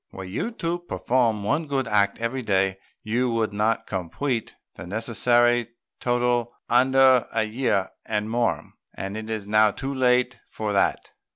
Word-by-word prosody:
Were 95 - -8
you 95 - -3
to 175 -5 -2
perform 120 -10 0
one 150 +10 0
good 135 -3 -1
act 100 -2 +2
every 115 +3 -2
day, 95 -3 +1 0.3
you 120 +3 0
would 110 -2 0
not 105 +2 0
complete 110 - -3 0.2
the 85 - -10
necessary 120 +3 +1 0.3
total 120 -1 +1 0.2
under 130 0 +4
a - - +1
year 110 -3 0 0.2
and 105 -1 -1
more, 115 +1 -1 0.2
and 95 +1 -5
it 110 0 -6
is 110 -2 -3
now 110 +1 +5
too 135 +6 -4
late 125 -1 +2
for 105 -1 -4
that. 100 - 0
115 Hz, 155 wpm, -24 LUFS, 105-125 Hz, 0.3 s, now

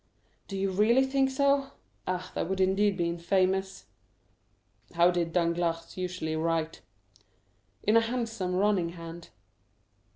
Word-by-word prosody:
"Do 195 - -5
you 195 0 0
really 225 +7 +4
think 270 0 +1
so? 275 0 +1 0.3
Ah, 185 0 -3
that - - -2
would 190 0 -2
indeed 195 +1 +2
be 170 -2 0
infamous." 185 +3 0 1.1
"How 170 +1 +5
did 170 -2 -1
Danglars 170 -1 -1
usually 180 -3 -3
write?" 165 0 -1 1.0
"In 215 - +3
a 230 - +7
handsome, 225 -6 -2
running 185 -3 +1
hand." 165 0 -9
185 Hz, 125 wpm, -29 LUFS, 170-210 Hz, 1.1 s, a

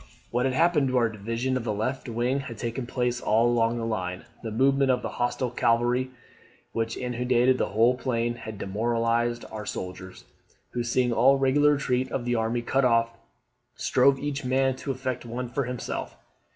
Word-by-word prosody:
'What 125 +2 +1
had 130 - -1
happened 165 -3 +3
to 130 0 +1
our 115 -2 +3
division 115 +5 -2
of 130 - -1
the 115 - -1
left 120 +5 -3
wing 120 +4 0
had 130 -4 -7
taken 120 +1 -4
place 125 -1 -1
all 110 +2 +3
along 120 -1 +2
the 115 - -2
line. 95 -4 -3 0.2
The 115 - -4
movement 135 +4 +2
of 125 - +2
the - - -2
hostile 120 0 0
cavalry, 120 +2 +1 0.6
which 115 0 -2
inundated 125 +1 +1
the - - +1
whole 115 +5 +3
plain, 120 -2 -1
had 110 -3 -8
demoralised 115 +3 0
our 105 -1 -6
soldiers, 95 0 -7 0.5
who 120 - -2
seeing 120 0 +1
all 130 +4 +5
regular 145 +2 +4
retreat 130 -2 0
of 120 - -2
the 120 - 0
army 115 +1 0
cut 135 +3 +1
off, 115 -2 +3 0.6
strove 135 +2 +3
each 145 0 -3
man 130 +1 +1
to 140 - -7
effect 130 -1 -3
one 120 +1 -4
for 135 +3 -2
himself. 125 0 -5
120 Hz, 180 wpm, -26 LUFS, 115-130 Hz, 0.6 s, all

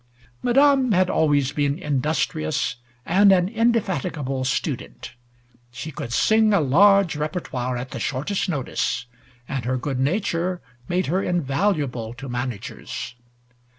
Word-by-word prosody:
Madame 270 -1 +4
had 185 0 +3
always 145 -3 +2
been 145 0 0
industrious 140 - -1 0.3
and 195 +4 +5
an 180 -2 +4
indefatigable 190 - 0
student. 130 - -3 0.6
She 150 +6 -7
could 120 - -6
sing 220 - +4
a - - +4
large 185 +5 +4
repertoire 145 -5 -3
at 125 +1 -6
the - - -5
shortest 150 +10 -2
notice, 135 -3 -2 0.4
and 135 -3 -3
her 130 +1 0
good 130 0 -3
nature 175 +3 0 0.3
made 180 +1 0
her 180 +6 0
invaluable 140 - -1
to 135 +2 -8
managers. 120 -1 -5
150 Hz, 120 wpm, -23 LUFS, 130-190 Hz, 0.6 s, and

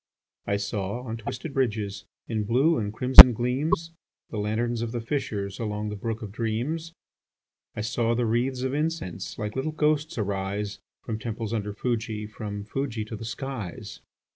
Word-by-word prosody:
I 100 - +1
saw, 100 +3 -3
on 115 -2 -5
twisted 125 +6 -6
bridges, 105 -6 -1 0.2
In 110 -2 -1
blue 135 +10 +3
and 105 -2 -2
crimson 125 +2 +11
gleams, 135 +8 -1 0.4
The 110 - -3
lanterns 115 +3 -1
of 115 0 -3
the 120 - -1
fishers, 105 -6 -3
Along 105 -2 -3
the 105 - -4
brook 110 +2 -4
of 105 - -7
dreams. 125 +10 -3 0.8
I - - -3
saw 115 +1 0
the 120 0 +1
wreathes 125 +3 0
of 130 0 -1
incense 150 - -3
Like 105 -2 -4
little 135 +4 -1
ghosts 155 -1 0
arise, 100 0 -2 0.2
From 110 -2 -4
temples 115 0 -4
under 105 -2 -2
Fuji, 110 -1 -2
From 105 -1 -6
Fuji 115 0 -3
to 110 - -7
the 110 - -7
skies. 115 - -6
115 Hz, 165 wpm, -26 LUFS, 105-130 Hz, 0.8 s, crimson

